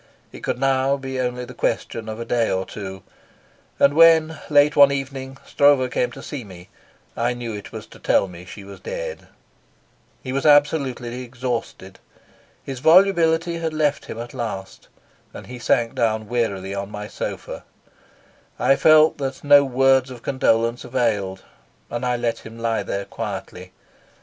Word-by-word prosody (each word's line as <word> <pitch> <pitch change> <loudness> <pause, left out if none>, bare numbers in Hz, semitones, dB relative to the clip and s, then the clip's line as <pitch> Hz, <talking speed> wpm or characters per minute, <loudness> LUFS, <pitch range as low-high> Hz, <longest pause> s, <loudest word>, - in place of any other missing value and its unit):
It - - -10
could - - -3
now 135 +1 +1
be 130 -1 -5
only 125 0 -2
the - - -11
question 110 -1 -2
of 110 +1 -6
a 115 - -4
day 115 -1 +1
or 95 0 -1
two; 95 -2 -8 0.7
and 140 0 +4
when, 160 -1 +5
late 145 0 +4
one 140 -1 +7
evening, 135 -1 -5
Stroeve 140 -3 +3
came 125 0 0
to - - -10
see 140 -4 -6
me 90 -4 -13 0.5
I 120 +1 0
knew 120 -2 -5
it 105 -1 -8
was - - -8
to - - -16
tell - - +2
me 90 -1 -11
she 100 +3 -11
was 100 0 -11
dead. - - -6 1.0
He 130 - -4
was 140 - -1
absolutely 140 -5 +2
exhausted. 120 -6 -5 0.6
His 135 -2 -6
volubility 170 0 +4
had 160 -1 -3
left 150 -2 0
him - - -7
at 120 +1 -7
last, 110 -6 -6 0.5
and - - -9
he 125 0 -9
sank 120 -1 +1
down 110 -2 0
wearily 100 -5 -2
on 100 0 -4
my 105 0 -6
sofa. - - -6 0.9
I 135 - +3
felt 155 -1 +5
that 135 -1 -4
no 145 0 +7
words 135 0 +3
of 125 -2 -10
condolence 115 -3 +1
availed, 110 -7 -1 0.5
and 120 +1 -3
I 125 -1 +1
let 120 -1 -2
him 110 +1 -12
lie 115 -2 -1
there 100 0 -4
quietly. - - -7
125 Hz, 165 wpm, -22 LUFS, 115-140 Hz, 1.0 s, one